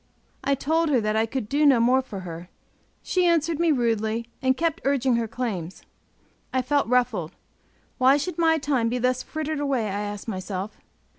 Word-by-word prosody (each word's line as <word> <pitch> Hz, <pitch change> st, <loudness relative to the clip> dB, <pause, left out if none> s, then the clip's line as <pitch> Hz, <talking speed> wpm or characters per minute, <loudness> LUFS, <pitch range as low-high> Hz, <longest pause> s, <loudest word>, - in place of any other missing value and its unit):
I 280 Hz, -, +2 dB
told 320 Hz, +4 st, +1 dB
her 265 Hz, -4 st, +3 dB
that 215 Hz, -1 st, -1 dB
I 220 Hz, +1 st, +2 dB
could 230 Hz, -2 st, -4 dB
do 290 Hz, +6 st, +1 dB
no 275 Hz, -5 st, +6 dB
more 250 Hz, +3 st, +4 dB
for 210 Hz, -7 st, -8 dB
her; 175 Hz, 0 st, -8 dB, 0.5 s
she 365 Hz, -1 st, +1 dB
answered 330 Hz, -1 st, +1 dB
me 340 Hz, -1 st, +3 dB
rudely, 230 Hz, -3 st, 0 dB
and 260 Hz, 0 st, +2 dB
kept 330 Hz, -1 st, -1 dB
urging 265 Hz, -2 st, +2 dB
her 230 Hz, -1 st, -1 dB
claims. 205 Hz, -7 st, -4 dB, 0.7 s
I 260 Hz, -1 st, 0 dB
felt 285 Hz, +1 st, +1 dB
ruffled; 240 Hz, -9 st, +1 dB, 0.7 s
why 260 Hz, +2 st, +5 dB
should 345 Hz, +3 st, -4 dB
my 325 Hz, -1 st, +4 dB
time 270 Hz, -6 st, 0 dB
be 245 Hz, -, -1 dB
thus 255 Hz, +1 st, +1 dB
frittered 310 Hz, -1 st, -4 dB
away, 275 Hz, -5 st, 0 dB
I 205 Hz, 0 st, -2 dB
asked 205 Hz, +1 st, -6 dB
myself. 190 Hz, 0 st, -5 dB
255 Hz, 180 wpm, -25 LUFS, 220-290 Hz, 0.7 s, no